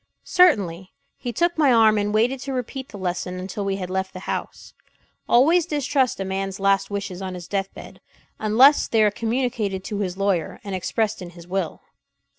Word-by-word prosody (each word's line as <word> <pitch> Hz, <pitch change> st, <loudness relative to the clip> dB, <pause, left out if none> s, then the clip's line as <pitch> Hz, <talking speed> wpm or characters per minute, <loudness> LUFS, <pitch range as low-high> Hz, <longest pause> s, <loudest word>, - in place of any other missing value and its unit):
"Certainly." 195 Hz, -, +3 dB, 0.2 s
He 245 Hz, -, -5 dB
took 345 Hz, +8 st, 0 dB
my 285 Hz, -4 st, +5 dB
arm 220 Hz, -2 st, +5 dB
and 205 Hz, 0 st, -1 dB
waited 235 Hz, +5 st, +1 dB
to 270 Hz, +1 st, -5 dB
repeat 260 Hz, +2 st, -5 dB
the 205 Hz, -, -9 dB
lesson 180 Hz, -1 st, -3 dB
until 190 Hz, +2 st, -5 dB
we 195 Hz, -1 st, -1 dB
had 185 Hz, -2 st, -5 dB
left 190 Hz, 0 st, -2 dB
the 185 Hz, -, -8 dB
house; -, -, -5 dB, 0.6 s
"Always 315 Hz, +8 st, +4 dB
distrust 280 Hz, -5 st, 0 dB
a 195 Hz, -, -2 dB
man's 195 Hz, 0 st, -3 dB
last 195 Hz, 0 st, +2 dB
wishes 195 Hz, -2 st, -4 dB
on 185 Hz, -1 st, -5 dB
his 175 Hz, -1 st, -8 dB
death 195 Hz, 0 st, -2 dB
bed -, -, -12 dB, 0.4 s
unless 245 Hz, +7 st, +5 dB
they 225 Hz, -1 st, +3 dB
are 210 Hz, -, +4 dB
communicated 225 Hz, -4 st, -2 dB
to 205 Hz, 0 st, -4 dB
his 185 Hz, -2 st, -3 dB
lawyer, 195 Hz, -5 st, -1 dB
and 200 Hz, -2 st, -6 dB
expressed 215 Hz, +3 st, -1 dB
in 180 Hz, -, -7 dB
his 170 Hz, -1 st, -13 dB
will." 185 Hz, -3 st, -3 dB
205 Hz, 190 wpm, -23 LUFS, 190-245 Hz, 0.6 s, my